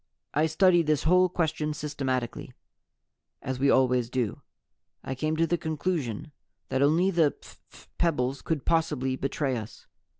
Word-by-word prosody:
"I 155 Hz, +2 st, +2 dB
studied 175 Hz, 0 st, +3 dB
this 155 Hz, -2 st, +2 dB
whole 180 Hz, +3 st, +4 dB
question 155 Hz, -3 st, -1 dB
systematically, 130 Hz, -5 st, -3 dB, 0.9 s
as 130 Hz, 0 st, -3 dB
We 140 Hz, +1 st, +3 dB
always 125 Hz, -2 st, +3 dB
do. 125 Hz, -4 st, -2 dB, 0.6 s
I 130 Hz, -, -4 dB
came 155 Hz, +4 st, -1 dB
to 165 Hz, -, +3 dB
the 175 Hz, +1 st, 0 dB
conclusion 155 Hz, -, -3 dB, 0.4 s
that 130 Hz, 0 st, 0 dB
only 165 Hz, +7 st, +3 dB
the 165 Hz, -5 st, +2 dB
phph -, -, -17 dB
pebbles 140 Hz, -6 st, 0 dB
could 160 Hz, -4 st, -2 dB
possibly 150 Hz, -6 st, +1 dB
betray 135 Hz, 0 st, -1 dB
us. 110 Hz, -1 st, -9 dB
150 Hz, 140 wpm, -27 LUFS, 130-165 Hz, 0.9 s, whole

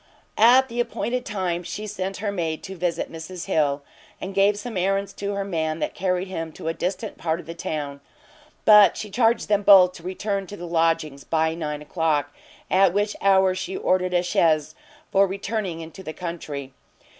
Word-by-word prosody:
At 250 Hz, +4 st, +7 dB
the 240 Hz, -1 st, -5 dB
appointed 245 Hz, +1 st, -2 dB
time 185 Hz, -4 st, -2 dB
she 180 Hz, +5 st, -6 dB
sent 195 Hz, -2 st, -4 dB
her 205 Hz, -, 0 dB
maid 165 Hz, -5 st, -3 dB
to 190 Hz, -, -7 dB
visit 175 Hz, -1 st, -2 dB
Mrs 165 Hz, +2 st, -7 dB
Hill, 145 Hz, -6 st, +1 dB, 0.4 s
and 190 Hz, -, -6 dB
gave 200 Hz, +1 st, +3 dB
some 220 Hz, +2 st, -6 dB
errands 195 Hz, +1 st, 0 dB
to 200 Hz, 0 st, -4 dB
her 200 Hz, -, -1 dB
man 160 Hz, -5 st, -2 dB
that -, -, -3 dB
carried 180 Hz, 0 st, -1 dB
him 165 Hz, -3 st, -5 dB
to -, -, -8 dB
a 165 Hz, -, 0 dB
distant 195 Hz, +5 st, -4 dB
part 160 Hz, 0 st, -1 dB
of -, -, -10 dB
the 165 Hz, -, -7 dB
town: 145 Hz, -4 st, -5 dB, 0.6 s
but 210 Hz, -3 st, +7 dB
she 210 Hz, -, -6 dB
charged 230 Hz, +2 st, +2 dB
them 205 Hz, -1 st, +2 dB
both 190 Hz, -3 st, +7 dB
to 180 Hz, -, -13 dB
return 195 Hz, +2 st, -3 dB
to 205 Hz, -, -8 dB
the 175 Hz, -, -7 dB
lodgings 165 Hz, -4 st, 0 dB
by 160 Hz, 0 st, +1 dB
nine 150 Hz, -2 st, -4 dB
o'clock, 150 Hz, -3 st, 0 dB, 0.3 s
at 190 Hz, -1 st, +4 dB
which 205 Hz, +1 st, 0 dB
hour 190 Hz, -1 st, +4 dB
she 185 Hz, +1 st, -4 dB
ordered 185 Hz, 0 st, +1 dB
a 175 Hz, -, +3 dB
chaise 155 Hz, -3 st, +2 dB, 0.4 s
for 195 Hz, 0 st, +4 dB
returning 195 Hz, -3 st, -3 dB
into 165 Hz, +4 st, -10 dB
the 155 Hz, -4 st, -7 dB
country. 150 Hz, -6 st, -6 dB
185 Hz, 190 wpm, -24 LUFS, 165-200 Hz, 0.6 s, At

